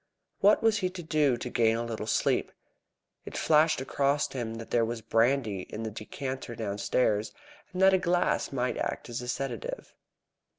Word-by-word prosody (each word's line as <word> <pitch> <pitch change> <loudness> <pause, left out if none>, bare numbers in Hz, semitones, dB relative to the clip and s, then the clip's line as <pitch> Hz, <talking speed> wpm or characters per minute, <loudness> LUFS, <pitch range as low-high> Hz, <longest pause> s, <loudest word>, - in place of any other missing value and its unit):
What 205 +3 +5
was 225 -2 +3
he 185 -2 0
to 180 -1 -8
do 150 -5 +2
to 120 - -5
gain 115 -2 +3
a 120 - -2
little 110 -2 -5
sleep? - - +1 0.7
It - - -7
flashed 155 -1 +4
across 140 +2 +1
him 115 -4 -3
that 115 0 -9
there 120 - +3
was 115 0 -3
brandy 115 -4 +1
in 110 - -5
the 110 - -4
decanter 130 +3 -6
downstairs, 105 0 0 0.4
and 180 - -5
that 190 0 +7
a 190 - +4
glass 180 0 +1
might 125 -2 -1
act - - -3
as 120 0 -4
a 125 - -7
sedative. 125 -3 -4
125 Hz, 175 wpm, -29 LUFS, 115-150 Hz, 0.7 s, that